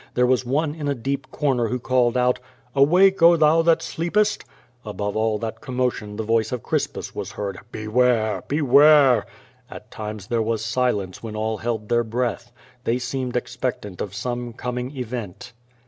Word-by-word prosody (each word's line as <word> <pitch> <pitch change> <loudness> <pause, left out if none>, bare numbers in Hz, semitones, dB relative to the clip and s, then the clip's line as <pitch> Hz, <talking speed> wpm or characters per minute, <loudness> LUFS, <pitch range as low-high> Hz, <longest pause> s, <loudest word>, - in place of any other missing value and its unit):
There 125 - +4
was 125 0 +2
one 145 +3 0
in 150 -2 -5
a 140 - 0
dark 135 +3 -3
corner 130 -6 0
who 125 - -1
called 125 -1 +1
out, 125 0 +2 0.4
"Awake, 180 +7 +5
oh, 170 +1 +8
thou 155 +1 +4
that 165 0 +3
sleepest!'' 205 +6 0 0.4
Above 105 -1 -4
all 110 0 +1
that 110 +1 -5
commotion 125 -6 -2
the 110 - -3
voice 115 0 +1
of 125 -2 -4
Crispus - - -2
was 100 0 -6
heard, 100 -3 -4
"Beware! 110 -2 +1
beware!'^ 145 -2 +5 0.4
At - - -11
times 105 -2 -6
there 115 +1 0
w^as 110 -1 -1
silence 110 -5 -1
when 110 -2 -7
all 110 0 -2
held 110 -2 -3
their 120 +1 +2
breath. 120 0 -3 0.3
They 120 +1 +1
seemed 125 0 -3
expectant 110 -6 -3
of 100 -1 -5
some 120 +1 -4
coming 125 +3 -5
event. 115 -7 -6
120 Hz, 165 wpm, -23 LUFS, 110-135 Hz, 0.4 s, oh